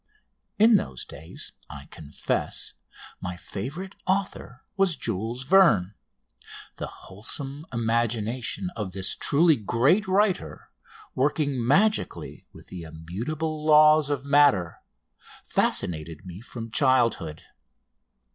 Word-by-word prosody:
In 220 +1 +6
those 65 - -5
days, 80 +3 -4 0.2
I - - -10
confess, 75 -2 -3 0.5
my 90 0 -5
favourite 150 - -6
author 190 -10 -2
was 195 -5 +3
Jules 115 +5 -3
Verne. 135 - +4 0.8
The - - -4
wholesome 135 - -5
imagination 115 - -1
of 100 -4 -5
this 95 0 +2
truly 155 +1 +3
great 130 - +2
writer, 195 0 0 0.4
working 140 -1 0
magically 205 - 0
with - - -16
the 90 - -8
immutable 115 - -5
laws 155 -1 +6
of 140 -2 -2
matter, 140 - +3 0.6
fascinated 80 -1 -1
me 90 +2 -9
from 115 -1 -8
childhood. 115 - +1
125 Hz, 100 wpm, -25 LUFS, 95-155 Hz, 0.8 s, In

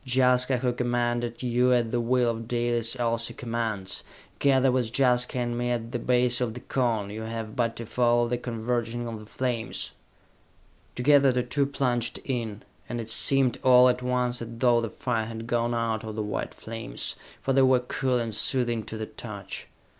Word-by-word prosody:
Jaska, 125 0 +3
who 125 0 0
commanded 120 -1 -1
you 125 +1 +3
at 120 -2 +1
the 120 0 +1
will 120 0 +2
of 115 0 -6
Dalis, 120 0 0
also 115 -1 -1
commands. 115 -5 -3 0.4
Gather 135 -2 +4
with 125 -3 0
Jaska 125 -1 +2
and 120 -1 -1
me 120 0 -1
at 115 -1 -2
the 120 - -2
base 125 +1 +2
of 115 -2 -1
the - - -5
Cone! 115 -6 -1
You 110 +1 -6
have 110 -1 -5
but 115 -2 0
to 115 - -6
follow 120 +1 +2
the 120 0 -1
converging 120 0 -2
of 115 -2 -5
the 105 - -12
flames!" 120 -1 -3 1.0
Together 140 +1 +5
the 125 0 0
two 135 +3 0
plunged 125 -4 -1
in, 115 -6 -3 0.3
and 120 - -3
it 115 -1 -3
seemed 135 +1 +4
all 125 -1 +7
at 125 0 0
once 125 -1 -1
as 115 - -4
though 120 -1 +4
the 115 - -3
fire 115 -1 -2
had 115 0 -6
gone 120 0 0
out 115 -2 -1
of 110 -1 -6
the 110 - -2
white 105 - -4
flames, 115 0 -5 0.3
for 135 - +1
they 135 - +5
were 130 -1 +5
cool 125 +1 -1
and 115 -2 -2
soothing 120 0 +1
to 110 - -6
the 110 - -3
touch. - - -8
120 Hz, 190 wpm, -27 LUFS, 115-125 Hz, 1.0 s, all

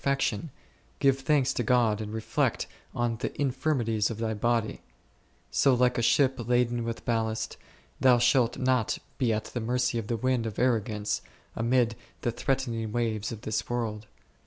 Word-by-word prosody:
fection, 140 +1 0 0.5
give 135 -1 +3
thanks 135 -1 +2
to - - -1
God 115 -3 +2
and 105 -1 -5
reflect 110 0 0 0.3
on 120 -1 0
the - - -3
in 140 -2 +2
firmities 120 -6 0
of 115 - -5
thy 110 -1 -1
body; 115 +1 0 0.7
so, 135 -2 +4
like 125 0 +3
a - - +2
ship 135 +3 +3
laden 120 -1 +2
with 115 0 -5
ballast, 110 -1 -1 0.4
thou 130 -2 +6
shalt 120 0 +3
not 130 -4 +1 0.2
be 125 -4 +2
at 110 0 0
the 120 - -2
mercy 125 +1 0
of 105 - -6
the 115 - -1
wind 125 -1 0
of 105 - -6
arrogance, 110 -4 0 0.3
amid 115 0 +2 0.3
the 120 - 0
threatening 120 -3 -1
waves 110 -2 -1
of 110 -2 -7
this 110 -2 -2
world. 110 -3 -3
120 Hz, 165 wpm, -28 LUFS, 110-125 Hz, 0.7 s, thou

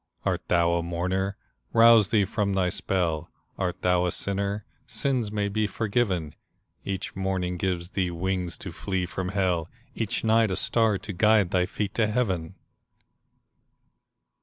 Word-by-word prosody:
Art - - 0
thou 85 -1 +3
a 85 - +1
mourner? 90 +3 -2 0.4
Rouse 115 -2 +7
thee 105 -2 +3
from 100 0 -1
thy 95 -2 +2
spell; 85 -3 -1 0.3
Art 90 -2 -2
thou 90 0 +3
a - - 0
sinner? 100 +2 -2 0.2
Sins 125 -6 -1
may 105 -1 0
be 105 +1 0
forgiven; 100 -7 -1 0.5
Each 95 -2 -4
morning 95 -2 -1
gives 90 -1 -2
thee 95 -2 0
wings 90 0 -2
to 95 - -4
flee 95 +1 -2
from 90 0 -4
hell, 90 -4 0 0.2
Each 115 0 -2
night 110 0 +4
a 95 - -1
star 110 -1 +2
to 105 +1 -7
guide 105 0 +4
thy 90 -1 +2
feet 105 +1 -3
to 110 -2 +2
heaven. 95 -7 -1
95 Hz, 150 wpm, -26 LUFS, 90-105 Hz, 0.5 s, Rouse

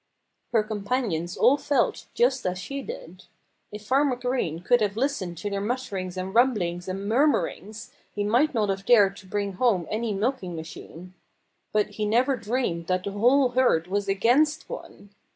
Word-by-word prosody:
Her 225 -3 +3
companions 205 -5 -2
all 280 - +5
felt 280 -4 0
just 255 +2 +2
as 180 0 -2
she 275 +9 -5
did. 185 -7 -9 0.5
If 210 0 -9
Farmer 270 +2 +2
Green 245 -10 -2
could 245 +4 +3
have 205 0 0
listened 230 - -2
to 205 - -4
their 200 0 -2
mutterings 200 -6 -3
and 185 +1 -4
rumblings 195 -8 +1
and 195 +2 -4
murmurings 220 - 0 0.2
he 205 - -2
might 245 +8 +2
not 210 -3 +1
have 195 0 -2
dared 200 -3 +4
bring 200 -1 -2
home 190 -4 +1
any 225 +1 -1
milking 200 -3 -2
machine. 165 +2 -10 0.6
But 210 -1 +1
he 210 0 -2
never 250 +5 +2
dreamed 225 -8 -2
that 185 0 0
the 200 - -4
whole 250 +6 +3
herd 245 -10 +2
was 200 +2 -2
against 245 +11 +2
one. 205 - -10
210 Hz, 165 wpm, -25 LUFS, 185-250 Hz, 0.6 s, all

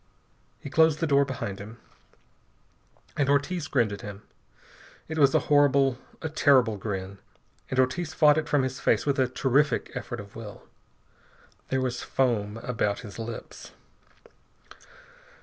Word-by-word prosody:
He 140 - -9
closed 160 -1 +4
the 165 - +1
door 140 -2 +3
behind 115 -7 -5
him, 110 +3 -10 1.4
and 140 -1 +1
Ortiz 145 +3 0
grinned 120 -7 +1
at 100 - -7
him. 105 0 -9 0.8
It 160 0 -4
was 140 -2 +5
a - - +4
horrible, 140 -3 +3 0.2
a - - -1
terrible 135 -7 +3
grin, 100 -1 -5 0.5
and 130 - -3
Ortiz 155 +6 +1
fought 155 -1 +5
it 155 - -5
from 145 -2 +2
his 130 0 -3
face - - +1
with 140 -2 0
a 130 - +3
terrific 135 +3 +1
effort 120 -1 -5
of 100 -1 -11
will. 105 -3 -9 1.1
There 130 0 0
was 125 -1 -2
foam 110 -5 0
about 110 -4 -1
his 105 -2 -10
lips. 115 0 -8
130 Hz, 145 wpm, -27 LUFS, 110-145 Hz, 1.4 s, was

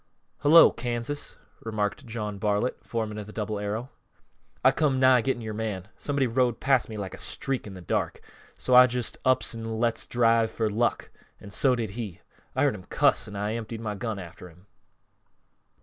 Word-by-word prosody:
"Hullo, 160 +3 +8
Kansas," 120 +4 -4 0.2
remarked 105 -1 -3
John 105 -3 -4
Bartlett, 105 +4 -1
foreman 110 -2 -3
of 105 - -7
the - - -9
Double 105 -1 -3
Arrow. 110 +5 -4 0.7
"I 130 - +8
come 135 -2 +1
nigh 130 -1 +6
getting 120 -1 -1
yore 110 -1 -4
man; 105 -3 -4
somebody 140 -2 0
rode 120 -1 +1
past 135 -4 +2
me 110 - -6
like 100 -2 -5
a - - -9
streak 135 -5 -2
in 95 - -9
th' 90 -2 -11
dark, - - -1 0.4
so 130 - -1
I 125 0 +9
just 120 -3 -3
ups 130 -1 +2
an' 115 -1 -5
lets 115 -1 0
drive 115 -2 +3
for 110 -2 -1
luck, 120 +3 0 0.3
an' 100 - -11
so 130 +4 +4
did 115 -4 -3
he. 105 -5 -6 0.4
I - - +2
heard - - +3
him - - -10
cuss - - +2
an' 105 - -9
I 105 +2 -2
emptied 115 0 -5
my 110 -2 -3
gun 105 +1 -4
after 90 -1 -10
him." 90 +3 -20
115 Hz, 190 wpm, -27 LUFS, 105-125 Hz, 0.7 s, I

